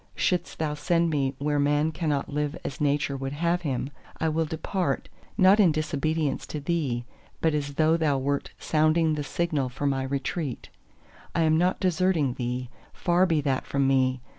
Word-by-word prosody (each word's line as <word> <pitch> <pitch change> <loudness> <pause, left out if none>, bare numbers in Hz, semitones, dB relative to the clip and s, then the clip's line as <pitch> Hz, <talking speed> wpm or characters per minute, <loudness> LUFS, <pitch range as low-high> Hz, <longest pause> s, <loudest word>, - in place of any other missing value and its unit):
Shouldst 180 -2 0
Thou 155 -2 -1
send 165 +2 +1
me 135 -2 0
where 145 +1 0
man 145 +2 +2
cannot 155 -4 -1
live 150 +1 -2
as 140 - -5
Nature 145 -1 +1
would 135 0 -4
have 170 +3 0
him, 135 -3 -2 0.3
I 160 - +1
will 160 +1 0
depart, 160 0 -2 0.3
not 190 +3 +6
in 185 -6 +6
disobedience 155 -1 -1
to 150 - -4
Thee, 140 -6 -1 0.3
but 160 -1 +2
as 145 -1 -2
though 160 +2 +3
Thou 150 -4 +1
wert 140 +1 -1
sounding 155 +1 +2
the 150 -1 -2
signal 150 -4 -1
for 130 +3 -5
my 135 -1 +1
retreat: 135 +1 -3 0.7
I 165 - +3
am 155 0 +4
not 180 +3 +2
deserting 180 -6 +1
Thee—far 125 +8 -1
be 160 -4 +2
that 135 -2 -1
from 140 0 +1
me! 130 -1 +2
150 Hz, 170 wpm, -26 LUFS, 140-165 Hz, 0.7 s, not